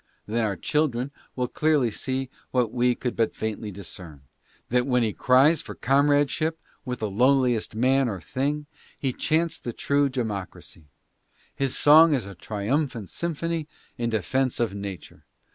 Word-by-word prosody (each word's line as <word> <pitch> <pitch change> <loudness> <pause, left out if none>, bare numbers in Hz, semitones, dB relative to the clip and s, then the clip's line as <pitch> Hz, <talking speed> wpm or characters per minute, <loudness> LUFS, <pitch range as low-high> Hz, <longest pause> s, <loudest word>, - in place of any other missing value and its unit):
Then 115 +2 -1
our 105 -3 0
children 135 - 0 0.2
will 125 -1 -1
clearly 150 -4 +2
see 130 +3 -3 0.2
what 120 -3 0
we 125 0 +2
could 125 - -3
but 115 - 0
faintly 110 0 -4
discern, 85 -6 -10 0.5
that 125 +1 +2
when 125 -2 +2
he 110 -2 0
cries 135 +5 +4
for - - -9
com 140 +4 +3
radeship 145 +3 +2 0.3
with 125 -1 -3
the 110 - 0
lowliest 125 0 +2
man 130 +2 +3
or 100 -4 -4
thing 145 - -2 0.3
he 135 -3 -1
chants 165 +4 0
the 120 - -5
true 140 +3 +1
democracy. 105 - -5 0.7
His 135 -2 -1
song 155 +1 +7
is 120 -7 -2
a 100 - -8
triumphant 110 - -2
symphony 165 -1 -3 0.3
in 115 -1 -2
defense 125 +5 0
of 115 -4 0
nature. 100 -3 -7
125 Hz, 155 wpm, -25 LUFS, 110-140 Hz, 0.7 s, song